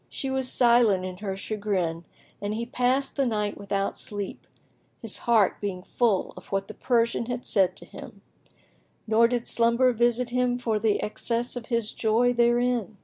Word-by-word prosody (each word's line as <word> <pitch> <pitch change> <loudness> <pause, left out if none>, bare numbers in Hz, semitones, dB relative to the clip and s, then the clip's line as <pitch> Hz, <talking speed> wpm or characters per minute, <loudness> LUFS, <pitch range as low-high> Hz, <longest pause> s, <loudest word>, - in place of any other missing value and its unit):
She 270 - -3
was 265 -1 -1
silent 235 -6 +4
in 185 -1 -6
her 195 -1 -4
chagrin, 195 -6 -2 0.4
and 205 +1 -2
he 230 +1 -3
passed 255 +3 0
the 275 - +2
night 210 -3 -1
without 200 0 -2
sleep, 205 -2 -6 0.5
his - - -3
heart 220 -5 +3
being 190 -3 -4
full 220 -2 0
of - - -12
what 195 0 -1
the 215 - -8
Persian 235 -1 0
had 245 0 -4
said 185 -3 +2
to - - -6
him; - - -12 0.8
nor 225 +1 +4
did 240 -1 -2
slumber 235 +2 +3
visit 240 +1 +1
him 250 0 +1
for 225 -3 -1
the 210 -1 +1
excess 235 +3 -1
of 240 -2 -6
his 230 -3 -1
joy 235 +2 +2
therein. 240 -2 +1
230 Hz, 170 wpm, -26 LUFS, 205-245 Hz, 0.8 s, silent